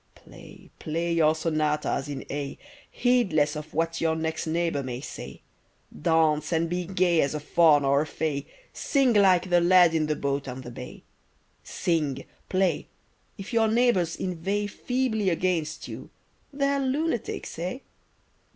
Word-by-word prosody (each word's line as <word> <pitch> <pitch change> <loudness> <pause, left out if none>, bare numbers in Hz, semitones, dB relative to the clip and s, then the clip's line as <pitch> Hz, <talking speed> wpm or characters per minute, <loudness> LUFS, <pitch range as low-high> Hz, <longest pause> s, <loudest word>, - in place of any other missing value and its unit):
Play, - - -15
play, 170 +2 -2
your 160 -1 +3
sonatas 155 -3 -1
in 140 - -5
A, 140 -1 -4 0.3
Heedless 185 - +2
of 150 +1 -7
what 165 +1 -1
your 160 -1 +1
next 160 0 -3
neighbour 165 -2 0
may 125 -2 -5
say! 135 - -9 0.5
Dance 155 - +2
and 165 0 +1
be 175 +1 -3
gay 180 -3 +2
as 140 +2 -1
a - - -2
faun 150 -1 +4
or 140 +1 +3
a 155 - -3
fay, 150 -2 -3 0.3
Sing 270 -4 +2
like 185 -3 +4
the 175 0 +5
lad 175 -1 +6
in 155 -1 +1
the 150 - 0
boat 140 -1 -2
on 130 0 -6
the 120 - -9
bay; 125 +1 -10 0.6
Sing, 150 -7 -1 0.2
play—if 190 +3 -4
your 225 -1 +3
neighbours 220 -7 +2
inveigh 190 +3 -2
Feebly 220 -1 -1
against 165 -3 -1
you, - - -8 0.4
they're 280 0 0
lunatics, 270 - -2
eh? 180 +8 -3
165 Hz, 145 wpm, -26 LUFS, 150-190 Hz, 0.6 s, lad